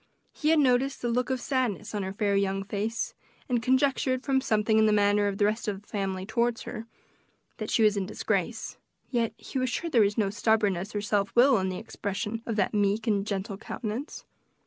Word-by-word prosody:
He 305 - 0
had 320 - +5
noticed 265 -1 +2
the 240 - 0
look 250 +2 0
of 260 -1 0
sadness 240 -6 -1
on 205 - -1
her 190 0 -3
fair 200 0 0
young 195 0 0
face, 215 +3 -3 0.3
and 245 -3 +1
conjectured, 260 +1 +2
from 265 -1 +2
something 220 -2 +2
in 220 - +5
the - - +4
manner 205 0 +3
of 200 -1 -2
the 205 - +3
rest 215 +2 -1
of 200 -2 -2
the - - -30
family 190 -2 -3
toward 235 +2 0
her, 225 - -7 0.7
that 215 -2 -5
she 225 - +3
was 210 -1 +4
in 195 -2 -2
disgrace; - - -2 0.3
yet 235 -3 +1
he 265 - -5
was 255 0 0
sure 335 +7 -3
there 235 - +5
was 205 0 +2
no 205 -3 +1
stubbornness 205 -3 +1
or 205 - 0
self 205 -1 0
will 245 -1 +6
in 190 0 -1
the 185 - -4
expression 210 +1 -4
of 225 - -1
that 200 -1 +1
meek 205 +2 +1
and 205 -3 +1
gentle 200 0 -3
countenance. 235 +6 -5
215 Hz, 215 wpm, -28 LUFS, 200-245 Hz, 0.7 s, will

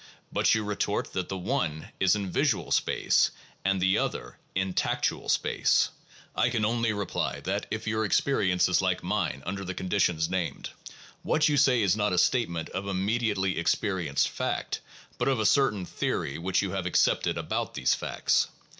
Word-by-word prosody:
But - - +3
you 110 - -1
retort 105 -1 -2
that 90 -1 -3
the 95 - -3
one 90 - -2
is 95 +1 +4
in 100 -3 -3
visual - - 0
space - - +2 0.3
and 95 0 +1
the 95 +1 +3
other - - -4 0.2
in 95 0 0
tactual - - -1
space. - - +2 0.5
I 120 - +2
can 115 -3 0
only 115 0 +1
reply 100 -3 -2
that, 100 +3 -2
if 110 0 -4
your 110 0 0
experience 100 -5 +2
is 90 0 +2
like 95 -1 0
mine 70 +1 -1
under 95 +2 -4
the 95 -1 -5
conditions 90 -4 +1
named, 90 -2 -3 0.5
what 155 - +2
you 150 - +2
say 130 -5 +4
is 95 -2 +3
not 105 -2 0
a - - 0
statement 90 -5 +1
of 95 +1 -4
im 95 -1 -1
mediately 100 -5 0
experienced 85 -4 0
fact, - - -3 0.4
but - - 0
of 135 -3 +2
a 110 - 0
certain 105 -6 +3
theory - - -2
which 95 +3 0
you 95 - -2
have 95 -2 -2
accepted 90 - +2
about - - -3
these 65 - +2
facts. - - +1
95 Hz, 175 wpm, -28 LUFS, 90-110 Hz, 0.5 s, is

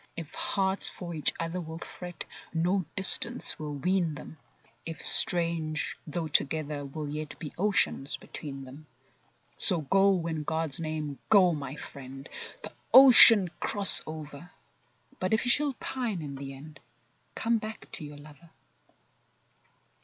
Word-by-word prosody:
If 165 -3 -9
hearts 195 -1 -1
for 175 -2 -1
each 155 -2 0
other 165 +2 -5
will 160 -1 -9
fret, 175 +1 -10 0.3
No 180 +3 -1
distance 230 +5 +2
will 150 -2 -7
wean 175 0 -2
them! 155 +1 -13 0.4
If 165 -1 -8
strange, 165 -3 +4
though 160 +1 -5
together, 150 0 -2
will 145 +2 -8
yet 150 0 -8
Be 150 - -10
oceans 185 -7 0
between 135 -2 -10
them. 140 +4 -14 0.7
So 175 -3 +5
go, 195 +3 +1
in 160 -2 -4
God's 160 -1 -4
name, 155 -3 -6
go, 190 -4 +4
my 145 -3 -7
friend, 135 -2 -12 0.4
The - - -9 0.2
ocean 230 -8 +7
cross 200 -2 +6
over; 155 +1 -10 0.7
But 185 +4 -1
if 220 - -3
you 245 - +3
should 290 -3 +2
pine 225 -10 -5
in 140 -2 -8
the 135 0 -9
end— 150 +3 -15 0.6
Come 230 0 -1
back 215 +1 -10
to - - -8
your 145 -1 -11
lover. 150 +3 -17
160 Hz, 140 wpm, -26 LUFS, 150-190 Hz, 0.7 s, ocean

